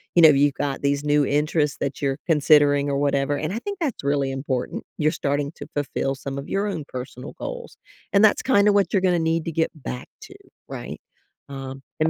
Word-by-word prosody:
you 170 - +6
know, 160 - +10
you've 140 -1 +4
got 140 -2 -2
these 140 0 0
new 145 -1 +3
interests 150 +1 +1
that 140 +1 -3
you're 135 -1 0
considering 145 -2 +4
or 140 - 0
whatever, 140 0 +1
and 155 +5 -3
I 230 - -2
think 405 +4 -5
that's 280 - -2
really 140 -1 +1
important. 135 -2 -3
You're 155 0 +2
starting 145 +1 -1
to 145 - -8
fulfill 140 -1 -1
some 140 0 -6
of 140 - -6
your 200 +2 0
own 170 -7 -3
personal 125 +1 -7
goals - - -7 0.4
and 200 +2 +5
that's 210 - +3
kinda 205 -5 +4
what 200 -1 +2
you're 195 - +2
gonna 180 -2 +3
need 165 0 0
to 165 - -2
get 160 0 +1
back 125 -3 -7
to, - - -12 0.3
right? - - -7 0.5
Um, 135 -1 -7 0.2
and 160 - +4
145 Hz, 210 wpm, -23 LUFS, 140-165 Hz, 0.5 s, know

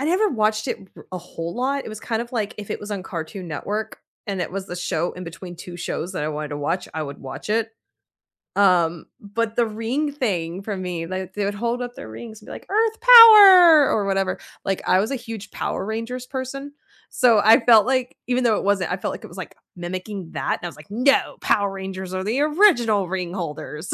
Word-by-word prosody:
I - - -2
never 370 +7 +2
watched 215 - 0
it - - -2 0.2
r - - -14
a 185 - -3
whole 170 -1 -7
lot, 270 +3 -1
it - - -7
was 215 0 -8
kind 230 -1 -2
of 235 - -11
like 215 -3 -2
if 205 - -8
it - - -3
was 205 - -8
on 200 -2 -4
Cartoon 175 +1 -7
Network, 205 +8 -4 0.3
and 195 -3 -3
it 175 - -4
was 195 0 -5
the 180 - -6
show 175 -1 -2
in 180 0 -8
between 175 +1 -9
2 175 +1 -9
shows 175 +1 -4
that 150 - -4
I - - -1
wanted 150 -1 -4
to 145 - -4
watch, 170 +6 -2
I 160 - -2
would 140 -1 -7
watch 135 +9 -8
it. 225 +1 0 0.9
Um, 175 -4 +2
but 220 +2 -3
the 235 -1 +2
ring 235 +7 -2
thing 190 - -3
for 205 0 -4
me 180 -3 -4
like, 185 +1 -6
they 205 -1 -1
would 205 - -2
hold 235 +4 -2
up 245 0 -7
their 110 - -9
rings 220 - -10
and - - -18
be, - - -9
like, - - -9
"Earth 445 +2 +1
power!" 400 - +9
Or 205 - 0
whatever 195 -1 -1 0.3
like, 195 -1 -1
I 185 - +4
was 220 +6 -1
a - - -1
huge 225 -4 -9
Power 190 - -3
Rangers 230 +3 -5
person, 275 +2 -6 0.4
so, 235 -4 +4
I 225 +2 +6
felt 225 -3 +7
like 255 -1 -1
even 250 0 0
though 220 -3 +3
it - - -3
wasn't 195 -4 +1
I 180 - -1
felt - - -4
like - - -9
it - - -9
was, - - -14
like, - - -8 0.2
mimicking 185 +1 -6
that, 135 -2 -1
and - - -8
I - - -1
was, 170 - -10
like, 150 +3 -15
"No, 255 +6 +2
Power 200 -1 +1
Rangers 190 -1 -6
are 185 - -2
the 235 +7 0
original 290 - +3
ring 180 -1 -4
holders!" 155 -1 -6
205 Hz, 235 wpm, -22 LUFS, 180-245 Hz, 0.9 s, power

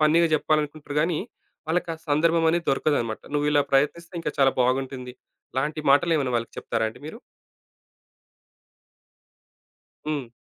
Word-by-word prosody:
ఫన్నీగా 160 +2 +4
జెప్పాలనుకుంటారు 150 -1 -1
గానీ, 165 0 +1 0.5
వాళ్ళకి 170 +1 0
ఆ - - -11
సందర్భమనేది 165 +2 +2
దొరకదన్నమాట. 135 -5 0
నువ్విలా 145 0 +3
ప్రయత్నిస్తే 165 +6 +1
ఇంకా 150 -3 -3
చాలా 135 -1 +5
బాగుంటుంది. 125 0 -1 0.4
ఇలాంటి 150 +4 -1
మాటలేమైనా 145 -2 +3
వాళ్ళకి 115 0 -4
చెప్తారా 115 -1 -1
అండి 110 - -12
మీరు? 190 +9 -8 2.9
హ్మ్. 140 -6 -3
150 Hz, 110 wpm, -25 LUFS, 135-160 Hz, 2.9 s, చాలా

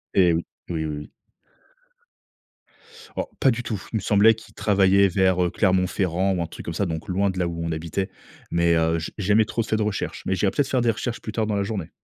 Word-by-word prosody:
Eh 90 -3 +5
oui. 85 +1 -1 0.2
Oui, 80 -2 -2
oui, 75 -1 -3
oui. 75 - -8 2.1
Oh, - - -1
pas 135 - +5
du 115 - -2
tout. 110 -5 -4
Il - - +2
me - - -3
semblait 105 +2 +5
qu'il 110 +1 -15
travaillait 100 -1 +4
vers, 95 0 +2
heu, 90 - +1
Clermont-Ferrand 95 -1 +1
ou 90 - -1
un 85 - -2
truc - - -10
comme 85 - -4
ça, 100 - 0
donc 80 -1 -4
loin 100 +2 +1
de 95 - -4
là 90 - +1
où 85 -1 -4
on 85 - -2
habitait. 85 +5 -3 0.4
Mais, 85 0 +3
heu, 80 0 +2
j 80 - -5
jamais 105 +2 +3
trop 115 - -2
fait 110 - -1
de 110 - +1
recherches, 105 -1 -3
mais - - 0
j'irai 95 +2 +2
peut - - +1
être 135 - 0
faire 130 -2 +1
des 115 -1 +3
recherches 115 +2 -4
plus 110 - -5
tard, 110 -1 0
dans 105 -1 -1
la 100 - +1
journée. 100 -6 -4
95 Hz, 245 wpm, -24 LUFS, 85-105 Hz, 2.1 s, Eh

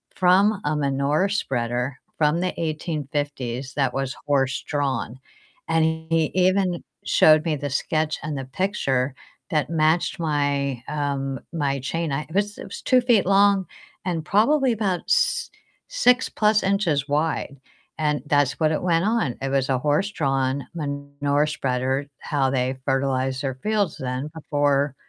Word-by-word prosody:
from 190 +3 +4
a 150 - +1
manure 145 +5 +1
spreader 125 - -1 0.2
from 155 +3 +2
the 185 - -1
1850s 145 -5 -3
that 135 -2 +1
was 135 -1 -2
horse-drawn, 135 -2 -1 0.5
and 165 0 +3
he 160 0 0
even 185 -1 +2 0.2
showed 155 +1 +5
me 155 -2 +1
the 145 0 -4
sketch 155 +3 -1
and 150 -2 -3
the 135 - -4
picture 135 -5 -1 0.3
that 150 -1 0
matched 165 +2 +1
my, 140 -5 0
um, 140 -3 -2
my 140 -4 0
chain. 165 +4 -2
I 140 +2 -1
it 170 - -10
was 205 0 0
it - - -8
was 195 - -8
2 255 -1 +4
feet 240 -6 +3
long 195 0 +4 0.4
and 165 -4 -2
probably 260 +6 +3
about 195 -5 -1
s 485 0 +2 0.4
six 260 - +3
plus 215 0 +2
inches 175 -8 +1
wide, 145 -2 -1 0.4
and 150 -1 0
that's 145 -1 +2
what 155 -1 +3
it 150 - -2
went 170 0 +2
on. 215 - 0
It 135 - -2
was 135 0 0
a 130 -1 +2
horse-drawn 140 -4 0
manure 140 0 -1
spreader, 135 -1 -1
how 140 -3 0
they 130 0 0
fertilized 135 -1 0
their 135 -2 -2
fields 205 +4 -1
then 130 +3 -4
before 145 -2 +1
150 Hz, 145 wpm, -23 LUFS, 135-175 Hz, 0.5 s, showed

